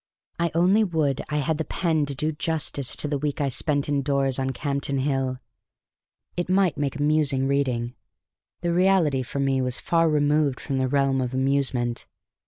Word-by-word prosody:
I 170 0 +1
only 185 +6 +4
would 155 -8 0
I 150 - -1
had 150 +2 -1
the - - +1
pen 160 -3 0
to 140 - -4
do 155 +4 -1
justice 150 -4 -2
to - - -2
the 145 -1 -1
week 145 +1 -2
I 140 -2 +1
spent 145 +2 0
in 145 -1 +1
doors 135 -1 +1
on 135 0 -1
Campden 140 0 -2
Hill! 135 -2 -1 1.0
It 175 0 -3
might 185 -2 +3
make 140 -2 -2
amusing 145 -2 +1
reading; 125 -4 0 0.7
the 170 -1 0
reality 175 -7 +3
for 130 +2 -5
me 135 -1 +1
was 125 -1 +1
far 165 -1 +2
removed 145 -2 +2
from 135 -3 -3
the 130 - +1
realm 135 0 +1
of 125 0 -3
amusement. 130 -3 0
140 Hz, 180 wpm, -24 LUFS, 135-155 Hz, 1.0 s, only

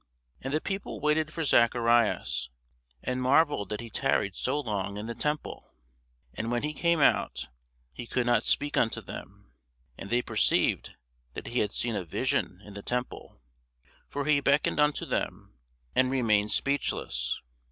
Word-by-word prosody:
And 135 - -4
the 155 - +2
people 195 +4 -4
waited 155 +1 +1
for 165 +1 -3
Zacharias, 115 - +3 0.5
and 125 0 -1
marvelled 135 - +3
that 105 +1 -3
he 115 -1 -9
tarried 105 -8 +1
so 140 +3 -1
long 105 -6 -2
in 105 - -5
the 115 - -4
temple. 150 +5 -4 0.6
And 115 - -3
when 120 +1 0
he 150 0 -1
came 170 +1 +2
out, 145 - +2 0.4
he 120 - -7
could 125 0 0
not 120 -3 +4
speak 145 0 +1
unto 115 - +2
them: 60 - -10 0.5
and 100 - -7
they 120 +1 +2
perceived - - +1 0.4
that - - -6
he 120 - -1
had 105 - +1
seen 120 -2 0
a 100 - -2
vision 80 - -1
in 105 - -10
the 100 - -7
temple: 125 - -4 0.6
for 145 0 -3
he 150 -1 +4
beckoned 140 +2 +2
unto 150 0 +2
them, 60 - -4 0.4
and 130 0 +4
remained 110 -5 +2
speechless. 65 - 0
120 Hz, 160 wpm, -29 LUFS, 105-145 Hz, 0.6 s, not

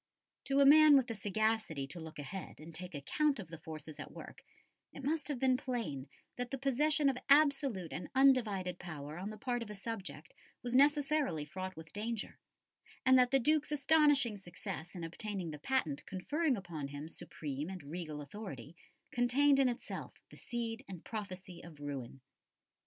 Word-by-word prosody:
To 275 0 +2
a - - +7
man 300 0 +9
with 265 - +3
the 230 - -4
sagacity 215 -7 0
to 145 +6 -9
look 160 -1 -8
ahead 150 +6 -7
and 160 +2 -10
take 180 0 -7
account 285 - +1
of 185 - -7
the 165 -1 -8
forces 155 -1 -8
at - - -7
work, - - -10 0.5
it 275 - -9
must 305 +3 0
have 290 -3 -2
been 255 0 +3
plain 215 - -3 0.3
that 245 0 -3
the 270 - -3
possession 285 +3 +2
of 265 -2 +1
absolute 275 - +4
and 180 - -5
undivided 215 -10 +4
power 155 -2 -7
on 195 +3 -4
the 215 - -7
part 245 +2 -1
of 230 - -6
a 210 - -6
subject 195 -8 -6 0.3
was 245 0 -2
necessarily 285 - +3
fraught 185 +3 -5
with 160 0 -11
danger, 220 +1 -3 0.7
and 260 - +7
that 250 -1 +5
the 270 - +4
Duke's 300 +3 +2
astonishing 290 -6 +4
success 175 -1 -7
in 175 - -5
obtaining 180 0 -4
the 150 - -7
patent 155 - 0
conferring 280 - 0
upon 170 -7 -5
him 145 +2 -6
supreme 150 -1 -5
and 185 -4 -7
regal 155 0 -5
authority 145 - -8 0.4
contained 270 +4 +4
in 265 -2 +5
itself 240 - -5 0.2
the - - -12
seed 235 0 -4
and 185 -4 -9
prophecy 190 -5 -6
of 160 -3 -12
ruin. 135 -3 -6
210 Hz, 175 wpm, -34 LUFS, 160-265 Hz, 0.7 s, man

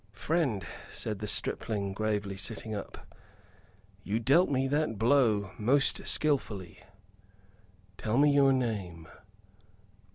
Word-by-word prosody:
"Friend," 120 - -1 0.3
said 105 -3 -5
the 105 - -4
stripling, 105 -1 -1
gravely, 105 -1 -2
sitting 110 +2 -6
up, 100 - -7 1.0
"you 105 +3 -1
dealt 140 +10 +4
me 135 -1 +1
that 145 -5 0
blow 110 -4 +3
most 135 +6 +2
skilfully. 105 - -1 1.2
Tell 110 +2 -1
me 145 +1 +5
your 140 -1 +5
name." 100 -10 -2
110 Hz, 105 wpm, -30 LUFS, 100-135 Hz, 1.2 s, me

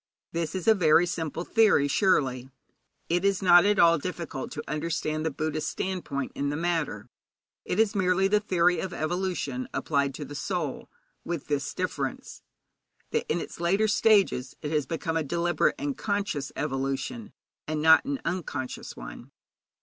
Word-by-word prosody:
This 165 -1 -3
is 185 +1 -4
a 220 - +8
very 170 -3 +4
simple 165 -2 -3
theory, 210 -9 +4
surely. 130 - +1 0.6
It 175 +2 +1
is 200 -1 +1
not 175 -1 +7
at 205 0 +3
all 170 -2 +5
difficult 170 -5 -5
to - - -5
understand 155 0 -2
the 160 - +1
Buddhist 155 +1 -3
standpoint 175 -8 -3
in 140 0 -2
the 145 - -2
matter. 165 -11 -2 0.6
It 185 - -2
is 220 -1 +3
merely 190 -1 +2
the 210 +1 +3
theory 180 -4 +2
of 185 -2 -4
evolution 155 -6 -2
applied 140 -2 0
to 150 - -6
the 145 - -9
soul, 145 - -3 0.3
with 170 -4 -4
this 145 -1 -1
difference: 145 -7 -4 0.7
that - - -1
in 175 - +1
its - - -8
later 195 +6 +2
stages 200 - +3
it 150 - -3
has 150 -3 0
become 165 0 -2
a 160 - 0
deliberate 170 +4 +1
and 290 -1 -2
a - - -4
conscious 200 - -2
evolution, 135 - -3 0.4
and 155 0 -2
not 160 +1 +6
an 280 0 -3
unconscious 145 -8 -4
one. - - -9
170 Hz, 165 wpm, -27 LUFS, 145-190 Hz, 0.7 s, a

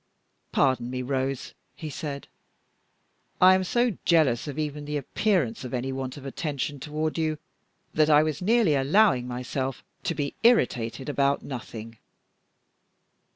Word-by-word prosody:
"Pardon 130 -3 +2
me, 125 0 -3
Rose," 135 0 -2 0.2
he 155 - -7
said; 140 -1 -5 1.1
"I 185 +1 +8
am 190 0 +2
so 240 +1 +1
jealous 150 -7 +3
of 145 - -5
even 150 -1 -3
the 150 0 -2
appearance 145 - 0
of 125 0 -4
any 130 +2 -2
want 130 0 -4
of 140 - -10
attention 145 0 -3
toward 155 +3 -2
you, 155 -1 0 0.6
that 155 0 +3
I 150 0 +6
was 155 0 -2
nearly 215 -3 +3
allowing 140 - +3
myself 125 +1 -3 0.2
to 170 - 0
be 140 -2 -2
irritated 130 - +2
about 140 -1 +1
nothing." 115 -3 -8
145 Hz, 140 wpm, -26 LUFS, 130-155 Hz, 1.1 s, I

